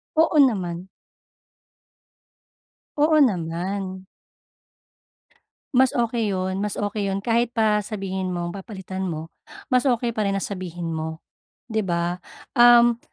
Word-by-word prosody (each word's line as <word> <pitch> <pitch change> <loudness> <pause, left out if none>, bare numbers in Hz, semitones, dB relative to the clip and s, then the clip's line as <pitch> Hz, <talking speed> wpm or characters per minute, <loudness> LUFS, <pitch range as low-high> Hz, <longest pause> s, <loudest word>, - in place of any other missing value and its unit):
Oo 320 0 +3
naman. 185 -9 +2 2.1
Oo 310 +2 +4
naman. 185 -2 -1 1.7
Mas 260 0 +5
okey 230 -3 0
'yun, 190 0 -2
mas 210 - -2
okey 205 0 -2
'yun. 195 - -1
Kahit 230 +3 +1
pa 215 -3 +2
sabihin 190 -3 -4
mo 175 -1 -3
papalitan 190 -1 -6
mo, 165 -3 -4 0.4
mas 250 +1 +2
okey 240 -3 0
pa 215 - 0
rin 200 - 0
na - - 0
sabihin 175 -3 -5
mo, 160 0 -4 0.5
‘di 220 -2 0
ba? 175 0 -1 0.4
Um, 240 -1 +7
200 Hz, 120 wpm, -23 LUFS, 185-235 Hz, 2.1 s, Um